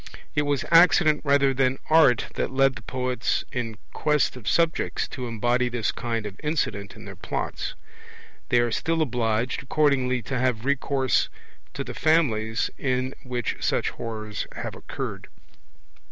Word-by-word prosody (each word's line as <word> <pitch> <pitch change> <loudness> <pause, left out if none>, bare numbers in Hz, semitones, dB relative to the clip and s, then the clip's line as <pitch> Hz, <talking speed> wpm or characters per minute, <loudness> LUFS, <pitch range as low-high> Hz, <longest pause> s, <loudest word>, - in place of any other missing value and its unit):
It 150 -1 +1
was 145 -2 0
accident 165 -3 +6
rather 140 -2 +3
than 130 0 +1
art 155 -7 +5
that - - -1
led 135 0 +3
the - - -8
poets 125 +2 -1
in 115 -5 -3 0.2
quest 150 -4 +1
of 125 -5 -10
subjects 165 -1 +1
to 125 -2 -5
embody 120 +2 +1
this 120 -2 -1
kind 115 -2 -3
of 100 -1 -7
incident 125 -10 -2
in 110 -1 -11
their 100 -1 -8
Plots. 95 - -4 0.7
They 120 - +4
are 120 -1 0
still 165 +7 +1
obliged, 115 -2 -1
accordingly, 130 -4 +1
to 130 +3 -3
have 125 -2 0
recourse 140 -1 +1 0.5
to - - -2
the - - -7
families 120 -9 +1
in 130 0 -1
which 125 -3 -3
such - - 0
horrors 110 -2 -5
have - - -5
occurred. - - -6
125 Hz, 150 wpm, -25 LUFS, 115-140 Hz, 0.7 s, accident